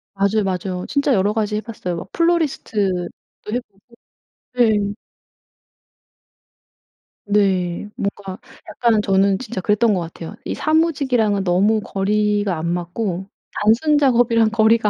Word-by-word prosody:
맞아요 200 Hz, +2 st, +1 dB
맞아요. 185 Hz, -1 st, -3 dB
진짜 280 Hz, -1 st, +1 dB
여러가지 210 Hz, +1 st, 0 dB
해봤어요. 215 Hz, -6 st, -5 dB
막 180 Hz, +3 st, -8 dB
플로리스트도 225 Hz, -, 0 dB, 0.4 s
해보고. 235 Hz, -5 st, -5 dB, 0.7 s
네. 215 Hz, -5 st, +2 dB, 2.3 s
네 195 Hz, -3 st, +1 dB
뭔가 200 Hz, -1 st, -5 dB, 0.3 s
약간은 230 Hz, -3 st, +1 dB
저는 195 Hz, -1 st, +2 dB
진짜 235 Hz, -6 st, -5 dB
그랬던 210 Hz, +2 st, +2 dB
것 185 Hz, -, 0 dB
같아요. 165 Hz, +3 st, -8 dB
이 -, -, -4 dB
사무직이랑은 275 Hz, -, +1 dB
너무 195 Hz, +4 st, +2 dB
거리가 205 Hz, -2 st, 0 dB
안 160 Hz, -, -3 dB
맞고 180 Hz, +2 st, -3 dB, 0.3 s
단순 255 Hz, +9 st, +3 dB
작업이랑 235 Hz, -5 st, +3 dB
거리가 220 Hz, 0 st, +3 dB
210 Hz, 275 characters per minute, -20 LUFS, 190-230 Hz, 2.3 s, 단순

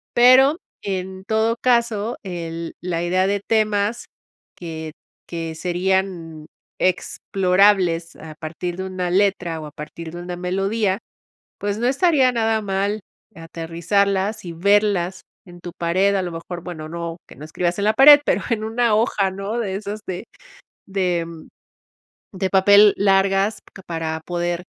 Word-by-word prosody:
Pero, 260 Hz, +5 st, +6 dB, 0.2 s
en 190 Hz, -1 st, -5 dB
todo 220 Hz, +2 st, +1 dB
caso, 235 Hz, -2 st, +1 dB
el 170 Hz, -3 st, -5 dB
la 175 Hz, -2 st, -2 dB
idea 185 Hz, +2 st, +1 dB
de 200 Hz, 0 st, 0 dB
temas 215 Hz, 0 st, +1 dB, 0.5 s
que 160 Hz, -2 st, -7 dB, 0.3 s
que 165 Hz, -1 st, -5 dB
serían 175 Hz, -2 st, -2 dB, 0.3 s
explorables 185 Hz, -1 st, +2 dB
a 155 Hz, 0 st, -10 dB
partir 170 Hz, +2 st, -5 dB
de 190 Hz, -, -4 dB
una 185 Hz, -1 st, -3 dB
letra 180 Hz, -4 st, +1 dB
o 155 Hz, -, -7 dB
a -, -, -11 dB
partir 160 Hz, +2 st, -8 dB
de 175 Hz, +1 st, -7 dB
una 175 Hz, 0 st, -5 dB
melodía, 195 Hz, +2 st, 0 dB, 0.6 s
pues, 205 Hz, 0 st, -2 dB
no 240 Hz, +2 st, 0 dB
estaría 275 Hz, -2 st, +3 dB
nada 225 Hz, -1 st, +1 dB
mal 200 Hz, +1 st, -1 dB, 0.3 s
aterrizarlas 190 Hz, +5 st, -1 dB
y 175 Hz, -, -6 dB
verlas 190 Hz, 0 st, +2 dB, 0.2 s
en 175 Hz, -1 st, -14 dB
tu 175 Hz, -, -7 dB
pared. 185 Hz, +4 st, +1 dB
A 195 Hz, -, +1 dB
lo 180 Hz, -1 st, -4 dB
mejor, 170 Hz, +1 st, -7 dB
bueno, 155 Hz, -4 st, -7 dB
no 170 Hz, 0 st, -5 dB
que -, -, -15 dB
no 150 Hz, -, -9 dB
escribas 175 Hz, +3 st, -2 dB
en 200 Hz, -, 0 dB
la 215 Hz, -, +3 dB
pared, 290 Hz, +5 st, +9 dB
pero -, -, +1 dB
en 220 Hz, -2 st, -1 dB
una 230 Hz, 0 st, +1 dB
hoja, 210 Hz, -3 st, +1 dB
¿no? 195 Hz, +4 st, -4 dB
De 200 Hz, -5 st, -2 dB
esas 210 Hz, +1 st, -5 dB
de 185 Hz, +3 st, -5 dB, 0.6 s
de 180 Hz, -3 st, -1 dB, 1.1 s
de 190 Hz, -2 st, -2 dB
papel 200 Hz, +2 st, +6 dB
largas 195 Hz, +1 st, +2 dB, 0.3 s
para 160 Hz, -1 st, -3 dB
poder 175 Hz, 0 st, -2 dB
190 Hz, 145 wpm, -21 LUFS, 170-205 Hz, 1.1 s, pared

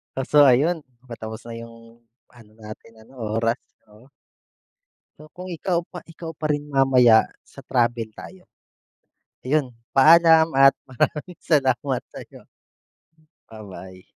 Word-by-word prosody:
Kaso 145 Hz, +2 st, +3 dB
ayun, 150 Hz, +5 st, +2 dB, 0.2 s
patapos 110 Hz, -1 st, -8 dB
na 115 Hz, -, -7 dB
yung 115 Hz, 0 st, -14 dB, 0.3 s
ano 115 Hz, -4 st, -19 dB
natin 110 Hz, +1 st, -13 dB
ano 130 Hz, +4 st, -19 dB, 0.2 s
oras 115 Hz, +1 st, 0 dB, 0.3 s
oo. 105 Hz, +4 st, -20 dB, 1.1 s
So 155 Hz, 0 st, -15 dB
kung 180 Hz, +1 st, -9 dB
ikaw 175 Hz, 0 st, -1 dB
pa 180 Hz, -, -11 dB
ikaw 165 Hz, 0 st, -8 dB
pa 155 Hz, 0 st, -5 dB
rin 145 Hz, 0 st, -1 dB
mamaya, 130 Hz, -5 st, +4 dB, 0.2 s
sa -, -, -15 dB
travel 120 Hz, -3 st, -1 dB
tayo 185 Hz, -1 st, -13 dB, 0.9 s
ayun 130 Hz, -1 st, -1 dB, 0.2 s
paalam 160 Hz, +2 st, +6 dB
at 135 Hz, 0 st, +7 dB, 0.2 s
maraming 150 Hz, +7 st, -3 dB
salamat 135 Hz, -3 st, 0 dB
sa'yo. -, -, -13 dB, 1.0 s
Ba-bye. 95 Hz, -4 st, -12 dB
130 Hz, 120 wpm, -22 LUFS, 115-155 Hz, 1.1 s, at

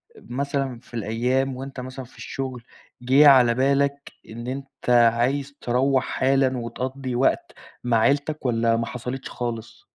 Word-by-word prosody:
مثلًا 135 Hz, 0 st, -3 dB
في 125 Hz, -, -23 dB
الأيام 125 Hz, +4 st, 0 dB
وأنت 135 Hz, +1 st, -7 dB
مثلًا 130 Hz, +1 st, -7 dB
في 125 Hz, -, -20 dB
الشغل 130 Hz, -3 st, -5 dB, 0.4 s
جيه 135 Hz, +4 st, +6 dB
على 125 Hz, -4 st, +7 dB
بالَك 140 Hz, +2 st, +1 dB, 0.2 s
إن 120 Hz, +2 st, -8 dB
أنت 135 Hz, 0 st, -6 dB
عايز 125 Hz, +4 st, +3 dB
تروَّح 130 Hz, +2 st, +2 dB
حالًا 130 Hz, 0 st, +1 dB
وتقضّي 130 Hz, +2 st, -4 dB
وقت 130 Hz, +2 st, +1 dB, 0.3 s
مع 120 Hz, -2 st, +2 dB
عيلتَك 145 Hz, +6 st, +1 dB
والّا 115 Hz, -1 st, +2 dB
ما 115 Hz, -, -1 dB
حصلتش 125 Hz, +3 st, -6 dB
خالص؟ 120 Hz, -1 st, -6 dB
130 Hz, 140 wpm, -24 LUFS, 120-135 Hz, 0.4 s, على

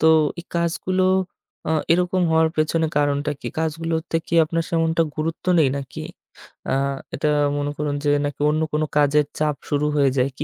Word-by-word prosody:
তো 160 Hz, -, +3 dB, 0.3 s
এই -, -, -14 dB
কাজগুলো 175 Hz, +2 st, 0 dB, 0.7 s
আ -, -, 0 dB, 0.2 s
এরকম 180 Hz, +1 st, +1 dB
হওয়ার 160 Hz, 0 st, +4 dB
পেছনে 160 Hz, +1 st, +1 dB
কারণটা 145 Hz, 0 st, +1 dB
কি? -, -, -7 dB
কাজগুলোতে 160 Hz, +1 st, -1 dB
কি 170 Hz, -, -3 dB
আপনার 165 Hz, +1 st, -1 dB
তেমনটা 165 Hz, 0 st, +2 dB
গুরুত্ব 160 Hz, +1 st, -3 dB
নেই 145 Hz, -4 st, +5 dB
নাকি? 135 Hz, -2 st, -6 dB, 0.7 s
আ -, -, +2 dB, 0.4 s
এটা 150 Hz, +2 st, 0 dB, 0.3 s
মনে 145 Hz, 0 st, -1 dB
করুন 145 Hz, -1 st, -1 dB
যে, 145 Hz, -, +1 dB, 0.2 s
নাকি 145 Hz, 0 st, -5 dB
অন্য 155 Hz, +1 st, +1 dB
কোন 155 Hz, -, +1 dB, 0.2 s
কাজের 150 Hz, 0 st, +4 dB
চাপ 150 Hz, -1 st, +1 dB
শুরু 145 Hz, 0 st, +1 dB
হয়ে 140 Hz, -2 st, +4 dB
যায়? 130 Hz, +2 st, +2 dB
কি -, -, -3 dB
155 Hz, 175 wpm, -22 LUFS, 145-165 Hz, 0.7 s, নেই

